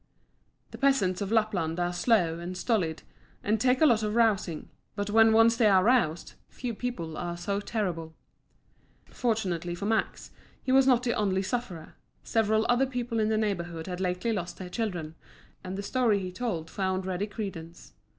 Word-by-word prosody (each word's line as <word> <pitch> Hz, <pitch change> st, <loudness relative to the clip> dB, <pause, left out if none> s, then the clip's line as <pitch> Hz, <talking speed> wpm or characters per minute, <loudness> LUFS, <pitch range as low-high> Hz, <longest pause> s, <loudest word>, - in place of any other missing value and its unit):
The -, -, -9 dB
peasants 220 Hz, -10 st, +2 dB
of 200 Hz, 0 st, -3 dB
Lapland 195 Hz, -7 st, +1 dB
are 175 Hz, 0 st, 0 dB
slow 175 Hz, -5 st, +2 dB
and 180 Hz, +2 st, -6 dB
stolid 180 Hz, -8 st, -1 dB, 0.4 s
and 215 Hz, +1 st, 0 dB
take 255 Hz, +2 st, +3 dB
a -, -, +7 dB
lot 235 Hz, -7 st, +4 dB
of 210 Hz, 0 st, -2 dB
rousing, 205 Hz, -8 st, +1 dB, 0.3 s
but 205 Hz, 0 st, -3 dB
when 225 Hz, +1 st, +6 dB
once 225 Hz, +1 st, +5 dB
they 225 Hz, -, +4 dB
are 190 Hz, -2 st, +5 dB
roused, 205 Hz, -9 st, +1 dB, 0.2 s
few 245 Hz, -2 st, -5 dB
people 185 Hz, -10 st, -5 dB
are 175 Hz, 0 st, -4 dB
so 200 Hz, +3 st, -2 dB
terrible. 175 Hz, -7 st, -3 dB, 1.0 s
Fortunately 185 Hz, -8 st, -1 dB
for 190 Hz, +3 st, -5 dB
Max, 220 Hz, +1 st, -1 dB, 0.3 s
he 260 Hz, -, -1 dB
was 265 Hz, 0 st, +5 dB
not 250 Hz, -2 st, +4 dB
the 240 Hz, -1 st, +1 dB
only 195 Hz, -2 st, 0 dB
sufferer; 190 Hz, -7 st, -4 dB, 0.3 s
several 220 Hz, -1 st, +1 dB
other 245 Hz, +2 st, +3 dB
people 245 Hz, -3 st, -3 dB
in 215 Hz, 0 st, +2 dB
the 220 Hz, -, +1 dB
neighbourhood 175 Hz, -6 st, -2 dB
had 180 Hz, 0 st, -5 dB
lately 180 Hz, +5 st, -1 dB
lost 180 Hz, -4 st, -4 dB
their 185 Hz, -1 st, -7 dB
children, 180 Hz, -8 st, -3 dB, 0.5 s
and 185 Hz, +1 st, -5 dB
the 200 Hz, -, -4 dB
story 235 Hz, -2 st, +2 dB
he 185 Hz, -2 st, -4 dB
told 180 Hz, -6 st, -3 dB
found 190 Hz, +1 st, -2 dB
ready 190 Hz, +2 st, -2 dB
credence. 175 Hz, -6 st, -7 dB
205 Hz, 175 wpm, -28 LUFS, 175-230 Hz, 1.0 s, a